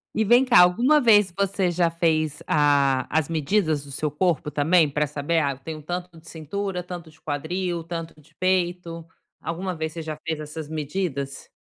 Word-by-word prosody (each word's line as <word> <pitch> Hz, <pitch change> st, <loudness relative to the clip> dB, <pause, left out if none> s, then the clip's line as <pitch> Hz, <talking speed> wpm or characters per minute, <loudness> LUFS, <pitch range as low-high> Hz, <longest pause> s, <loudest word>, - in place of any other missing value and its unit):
E 220 Hz, -, +2 dB
vem 240 Hz, +5 st, +6 dB
cá, 250 Hz, -2 st, +6 dB
alguma 240 Hz, +12 st, +4 dB
vez 210 Hz, -7 st, +5 dB
você 195 Hz, -2 st, +1 dB
já 175 Hz, 0 st, +2 dB
fez 155 Hz, -3 st, 0 dB
a 140 Hz, -3 st, +3 dB
as 155 Hz, -2 st, 0 dB
medidas 160 Hz, -1 st, 0 dB
do 140 Hz, -, -11 dB
seu 150 Hz, +3 st, -2 dB
corpo 150 Hz, -1 st, 0 dB
também 155 Hz, +2 st, +3 dB
pra 150 Hz, +2 st, 0 dB
saber: 150 Hz, +3 st, -1 dB
"Ah, 145 Hz, -3 st, +1 dB
eu 135 Hz, -, -8 dB
tenho 155 Hz, +3 st, -7 dB
um -, -, -12 dB
tanto 175 Hz, +1 st, -6 dB
de 160 Hz, 0 st, -15 dB
cintura, 180 Hz, +4 st, -4 dB
tanto 175 Hz, -2 st, -8 dB
de 155 Hz, -, -24 dB
quadril, 170 Hz, +4 st, -3 dB
tanto 165 Hz, -1 st, -6 dB
de 150 Hz, -, -23 dB
peito", 175 Hz, -2 st, -1 dB, 0.3 s
alguma 180 Hz, +2 st, -4 dB
vez 160 Hz, -1 st, -4 dB
você 165 Hz, -, -5 dB
já 155 Hz, -1 st, -5 dB
fez 160 Hz, -2 st, -2 dB
essas 150 Hz, 0 st, -7 dB
medidas? 150 Hz, -3 st, -4 dB
165 Hz, 190 wpm, -24 LUFS, 150-180 Hz, 0.3 s, vem